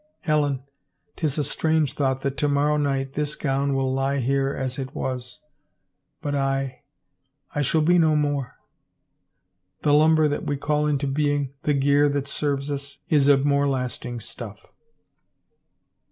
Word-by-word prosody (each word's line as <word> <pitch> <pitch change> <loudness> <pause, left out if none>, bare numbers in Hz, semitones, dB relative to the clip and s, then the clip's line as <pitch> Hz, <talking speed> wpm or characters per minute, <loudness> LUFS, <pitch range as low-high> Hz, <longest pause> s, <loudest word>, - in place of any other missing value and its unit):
Helen, 145 -4 +1 0.5
*tis 150 -3 -1
a 150 - +1
strange 155 +1 +1
thought 135 -2 0
that 140 0 -2
to 145 - +1
morrow 145 +1 +2
night 135 -2 -1
this 150 0 -2
gown 140 -1 0
will 135 -1 0
lie 135 +1 0
here 135 +1 +1
as 130 -1 -3
it 135 0 -6
was, 125 -1 -5 0.8
but 145 - -2
I 135 -1 -1 0.4
— - - -40
I 145 - 0
shall 155 +3 +2
be 175 +3 +4
no 160 -2 +4
more. 145 -3 -1 1.3
The 145 - +3
lumber 155 +1 +5
that 145 - -2
we 145 - 0
call 150 +1 0
into 145 -1 0
being, 145 -1 0
the 150 - +2
gear 145 +1 +4
that 140 -1 -2
serves 140 0 -2
us, 140 0 -5
is 145 -5 +4
of 140 -1 +5
more 140 0 +3
lasting 125 -2 -3
stuff." 110 -2 -9
140 Hz, 155 wpm, -24 LUFS, 135-150 Hz, 1.3 s, lumber